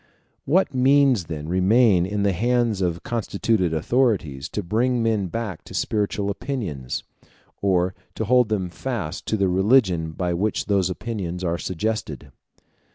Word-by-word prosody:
What 170 +2 +2
means 130 -5 +4
then 75 -2 -6
remain 95 +1 +4
in 100 0 -1
the 100 - +3
hands 120 +1 +1
of 85 -1 -1
constituted 110 -5 0
authorities 80 - 0
to 105 - -3
bring 120 +6 +1
men 110 -4 +1
back 105 -3 -5
to - - -10
spiritual 100 -1 -1
opinions, 95 - -4 0.6
or 95 -2 +2 0.2
to 110 - -2
hold 125 0 +4
them 95 -5 -1
fast 110 -7 -4
to 110 - 0
the 100 -1 +2
religion 95 -4 +2
by 90 +1 -1
which 105 +5 -1
those 100 -3 +1
opinions 95 -3 -4
are 85 -1 -1
suggested? 85 - -3
100 Hz, 145 wpm, -23 LUFS, 90-115 Hz, 0.6 s, means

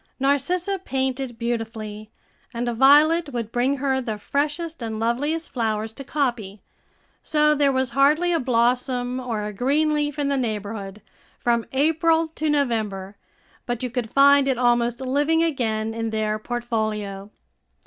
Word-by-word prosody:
Narcissa 345 +8 0
painted 265 -3 -2
beautifully, 220 -2 -4 0.5
and 240 +1 -2
Violet 295 +7 +5
would 230 -3 -4
bring 255 +4 +1
her 265 -1 0
the 220 -4 -4
freshest 295 +7 -2
and 220 -1 -4
loveliest 290 +9 -1
flowers 220 -2 -2
to 275 - -8
copy; 240 -9 -2 0.6
so 300 0 +3
there 285 -2 +3
was 260 -2 0
hardly 300 +7 +3
a 330 - +2
blossom 250 0 0
or 230 -5 -3
a 210 - -5
green 285 +8 +1
leaf 295 -1 -1
in 290 -1 0
the 280 0 0
neighborhood, 210 -3 -4 0.3
from 235 -1 0
April 320 +4 +2
to 315 -1 -2
November, 215 -9 -1 0.5
but 240 0 -3
you 250 - -3
could 245 -3 -3
find 280 +1 +5
it 265 -3 +1
almost 240 0 +1
living 290 +5 +1
again 225 -8 -1
in 225 0 -3
their 215 -1 -1
portfolio. 215 -4 -3
250 Hz, 145 wpm, -23 LUFS, 225-285 Hz, 0.6 s, Violet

